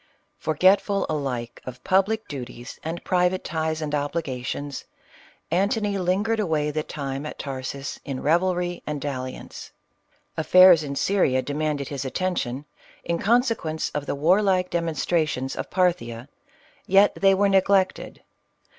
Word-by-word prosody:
Forgetful 195 +5 +3
alike 130 -6 -3
of 125 -1 -9
public 200 +4 +1
duties 125 -3 -8
and 165 +2 -5
private 180 0 +1
ties 160 0 -2
and 150 -1 -4
obligations, 145 -2 -3 0.7
Antony 200 +3 +1
lingered 200 +5 0
away 155 -6 0
the 155 +1 -1
time 140 -3 -5
at 150 - -7
Tarsus 135 0 -5
in 135 -3 -4
revelry 175 +2 +1
and 150 -1 -2
dalliance. 130 -2 -6 0.6
Affairs 180 +1 +7
in 140 -2 -5
Syria 135 -8 +2
demanded 145 -1 -2
his 140 -2 -4
attention, 140 -3 -2 0.4
in 170 0 -1
consequence 225 -8 +1
of 145 -1 -4
the - - -1
warlike 185 +4 +2
demonstra 165 -1 0
tions 130 -2 -3
of - - -5
Parthia, 140 -10 0 0.6
yet 195 +2 +5
they 195 -1 +4
were 200 +1 +3
neglected. 195 -1 +1
160 Hz, 130 wpm, -24 LUFS, 140-185 Hz, 0.7 s, Affairs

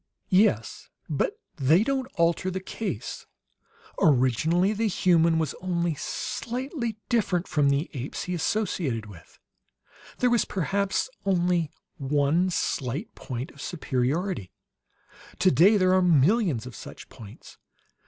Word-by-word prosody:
"Yes; 185 - +2 0.2
but - - -1 0.2
they 155 +9 +4
don't 265 +1 -1
alter 170 +1 +1
the 190 0 -3
case. 185 - -5 0.7
Originally 155 - +3
the 220 +1 0
human 170 -4 +3
was 160 -3 -1
only 175 -2 0
slightly 240 - -4
different 195 -7 0
from 145 -2 +2
the 140 +4 +1
apes 135 -1 -5
he 180 - -4
associated 170 - -1
with. 100 -6 -14 0.8
There 250 -1 +2
was 240 - +3
perhaps 195 - -1 0.2
only 175 -4 +1 0.3
one 145 +5 +1
slight 140 - -2
point 125 0 -6
of 140 - -13
superiority; 150 - -2 0.9
today 185 +3 +5
there 185 -1 +3
are 185 - +4
millions 170 - +3
of 125 - -9
such - - -10
points. 105 -3 -13
175 Hz, 120 wpm, -26 LUFS, 140-195 Hz, 0.9 s, today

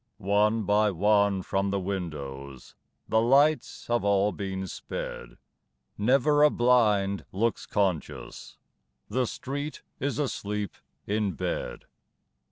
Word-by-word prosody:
One 105 +2 +2
by 105 +1 +3
one 100 0 +2
from 100 +2 0
the 100 0 0
windows 70 -8 -6 0.3
The 110 - +3
lights 140 +6 +3
have 120 -2 0
all 100 0 +3
been 95 +1 -4
sped. - - -6 0.6
Never 135 +7 +3
a 150 - +8
blind 105 -7 +3
looks 115 +4 -1
conscious 95 -6 -2 0.5
The 130 -1 0
street 145 +6 -5 0.2
is 140 +1 -1
asleep 105 -8 -2 0.3
in 105 -2 0
bed! - - -4
105 Hz, 110 wpm, -27 LUFS, 95-120 Hz, 0.6 s, a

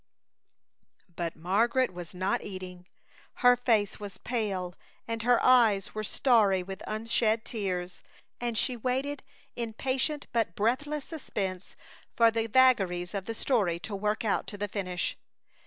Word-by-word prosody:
But 170 -1 -3
Margaret 225 +8 +1
was 175 0 -8
not 185 +1 0
eating. 185 -2 -8 0.6
Her 245 0 +8
face 225 -5 +1
was 205 -2 -8
pale 195 -7 -2 0.3
and 230 0 -2
her 245 +1 +4
eyes 225 -6 +4
were 215 - -3
starry 210 -5 +3
with 190 +1 -8
unshed 220 0 0
tears, 185 -5 -3 0.4
and 240 -2 -2
she 250 - 0
waited 260 +4 -2 0.3
in 230 -2 -4
patient 270 +5 -1
but 225 -8 0
breathless 275 +7 0
suspense 195 - -4 0.4
for 230 -1 +6
the 225 0 -1
vagaries 195 -8 +3
of 195 -2 -3
the 225 - -4
story 205 -10 +1
to 205 +4 -5
work 210 +3 -1
out 205 - 0
to 205 - -7
the 205 +1 -2
finish. 185 -3 -3
215 Hz, 140 wpm, -29 LUFS, 190-240 Hz, 0.6 s, Her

